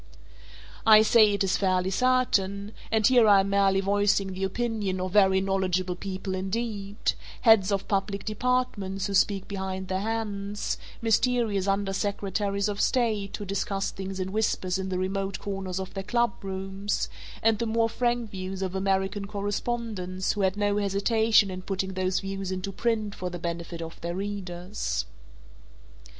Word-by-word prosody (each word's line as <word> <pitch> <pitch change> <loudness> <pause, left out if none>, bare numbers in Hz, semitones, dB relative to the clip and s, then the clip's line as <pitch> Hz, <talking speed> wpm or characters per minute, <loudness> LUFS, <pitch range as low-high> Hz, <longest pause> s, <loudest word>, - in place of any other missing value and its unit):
I 215 -1 +8
say 220 -1 +6
it 200 - +1
is 195 - +1
fairly 185 -1 +1
certain 205 -4 +1 0.2
and 220 -1 +3
here 245 -2 +6
I 200 -2 +7
am 195 +1 -2
merely 195 -1 +3
voicing 200 -1 +2
the 190 +1 -4
opinion 210 -2 -2
of 185 0 -2
very 190 -1 +5
knowledgeable 185 -2 0
people 190 +1 -5
indeed, 200 +1 -3 0.4
heads 220 -4 +6
of 195 -1 -1
public 200 0 -1
departments 215 -4 -1
who 200 - -3
speak 195 0 +2
behind 190 -1 -4
their 185 0 0
hands, 205 -2 -3 0.2
mysterious 225 -3 +2
under 195 0 0
secretaries 200 0 -1
of 205 -1 -2
state 220 -6 +1
who 205 - -6
discuss 195 0 -2
things 190 0 -6
in 185 0 -2
whispers 190 -3 0
in 190 0 -3
the 185 - -1
remote 195 +1 -2
corners 190 -2 -4
of 190 -1 -6
their 195 - -3
clubrooms 195 -3 -1 0.4
and 225 -1 +3
the 235 - -1
more 225 +1 +2
frank 240 -1 -1
views 190 -1 -4
of 185 -1 -3
American 195 +1 0
correspondents 205 -2 -2
who 210 - -2
had 190 +1 +1
no 205 0 +1
hesitation 210 +1 +3
in 185 0 -5
putting 190 0 -3
those 185 0 0
views 195 -1 -4
into 185 +1 -3
print 215 -1 -1
for 180 -2 -4
the 175 - -6
benefit 170 0 -4
of 165 0 -9
their 170 +1 -3
readers. 190 - -3
195 Hz, 160 wpm, -27 LUFS, 190-210 Hz, 0.4 s, I